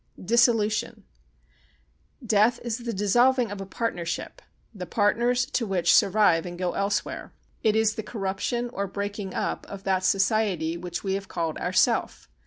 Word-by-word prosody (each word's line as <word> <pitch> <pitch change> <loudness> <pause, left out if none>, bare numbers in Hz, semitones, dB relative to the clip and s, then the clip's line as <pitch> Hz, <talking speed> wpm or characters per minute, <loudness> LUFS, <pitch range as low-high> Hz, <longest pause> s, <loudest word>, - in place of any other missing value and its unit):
Dissolution 220 0 +1 1.2
Death 220 +2 +3
is 235 0 -3
the 235 -1 -4
dissolving 240 +4 +2
of 205 -1 -6
a 195 - -7
partnership, 195 - -4 0.3
the 185 -4 -7
partners 235 +5 +2
to 235 -6 -1
which 175 -3 +2
survive 195 -5 +4
and 175 0 -7
go 180 -1 -2
elsewhere. 200 0 -2 0.3
It 220 -1 +2
is 220 -1 +3
the 220 - -4
corruption 215 +3 -3
or 200 0 -2
breaking 200 0 -5
up - - -2
of 195 -1 -9
that 190 -1 0
society 195 -4 +1
which 175 0 -6
we 190 -1 -1
have 195 0 -3
called 165 -3 -3
Ourself. - - +1
205 Hz, 150 wpm, -26 LUFS, 190-225 Hz, 1.2 s, survive